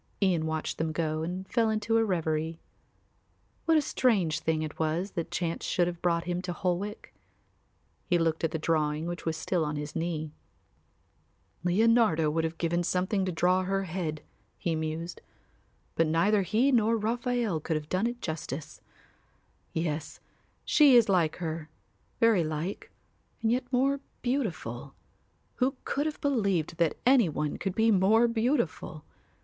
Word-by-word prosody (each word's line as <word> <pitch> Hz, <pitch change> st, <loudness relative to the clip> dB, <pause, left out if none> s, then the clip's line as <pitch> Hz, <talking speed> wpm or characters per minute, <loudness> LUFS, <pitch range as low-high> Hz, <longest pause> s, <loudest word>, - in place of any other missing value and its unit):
Ian 175 Hz, -5 st, +2 dB
watched 160 Hz, -1 st, -3 dB
them 160 Hz, 0 st, 0 dB
go 155 Hz, -1 st, -1 dB
and 180 Hz, +3 st, -4 dB
then -, -, -28 dB
fell 230 Hz, -2 st, +3 dB
into 220 Hz, +1 st, +1 dB
a -, -, +3 dB
reverie. 160 Hz, -4 st, -1 dB, 1.1 s
What 325 Hz, -1 st, +4 dB
a 305 Hz, -, +3 dB
strange 190 Hz, -, +1 dB
thing 160 Hz, -1 st, 0 dB
it 155 Hz, -, -7 dB
was 165 Hz, +5 st, -1 dB
that 170 Hz, -, -4 dB
chance 170 Hz, -2 st, -2 dB
should 175 Hz, -, +1 dB
have 175 Hz, -1 st, -4 dB
brought 170 Hz, -1 st, +1 dB
him 175 Hz, 0 st, -2 dB
to 180 Hz, -1 st, -4 dB
Holwick! 185 Hz, +4 st, -3 dB, 0.9 s
He 175 Hz, -, +3 dB
looked 165 Hz, -1 st, 0 dB
at 165 Hz, -, +2 dB
the 160 Hz, -, -3 dB
drawing 155 Hz, -1 st, 0 dB
which 175 Hz, -1 st, -5 dB
was 160 Hz, -1 st, 0 dB
still 170 Hz, +1 st, 0 dB
on 150 Hz, 0 st, -2 dB
his 145 Hz, 0 st, -5 dB
knee. 160 Hz, -2 st, -2 dB, 1.3 s
"Leonardo 180 Hz, -4 st, +3 dB
would 160 Hz, +1 st, 0 dB
have 160 Hz, 0 st, -4 dB
given 170 Hz, +1 st, 0 dB
something 185 Hz, +3 st, 0 dB
to 185 Hz, -, -1 dB
draw 180 Hz, +2 st, +2 dB
her 195 Hz, +1 st, -1 dB
head," 160 Hz, -4 st, -4 dB, 0.3 s
he 170 Hz, -, -1 dB
mused. 160 Hz, +2 st, -4 dB, 0.7 s
"But 165 Hz, -, +2 dB
neither 195 Hz, +6 st, +3 dB
he 220 Hz, +9 st, +2 dB
nor 230 Hz, -2 st, +3 dB
Raphael 235 Hz, -3 st, 0 dB
could 160 Hz, +1 st, -2 dB
have 150 Hz, -1 st, -3 dB
done 185 Hz, +7 st, +1 dB
it 240 Hz, 0 st, -5 dB
justice. 155 Hz, -3 st, -5 dB, 0.9 s
Yes, 160 Hz, -2 st, -3 dB, 0.5 s
she 290 Hz, -4 st, +6 dB
is 235 Hz, -4 st, +6 dB
like 170 Hz, -4 st, +2 dB
her, 160 Hz, -2 st, -5 dB, 0.5 s
very 225 Hz, -6 st, +4 dB
like, 155 Hz, +5 st, -4 dB, 0.5 s
and 225 Hz, -, +3 dB
yet 250 Hz, +1 st, -1 dB
more 270 Hz, +2 st, +2 dB, 0.2 s
beautiful. 165 Hz, -, -3 dB, 0.6 s
Who 265 Hz, +1 st, +1 dB
could 290 Hz, +2 st, -1 dB
have 305 Hz, -, -4 dB
believed 200 Hz, -, 0 dB
that 170 Hz, -2 st, +1 dB
any 250 Hz, -7 st, +5 dB
one 150 Hz, -1 st, -2 dB
could 195 Hz, -2 st, -3 dB
be 225 Hz, 0 st, +4 dB
more 215 Hz, +4 st, +4 dB
beautiful? 230 Hz, -, -1 dB
175 Hz, 160 wpm, -29 LUFS, 160-220 Hz, 1.3 s, she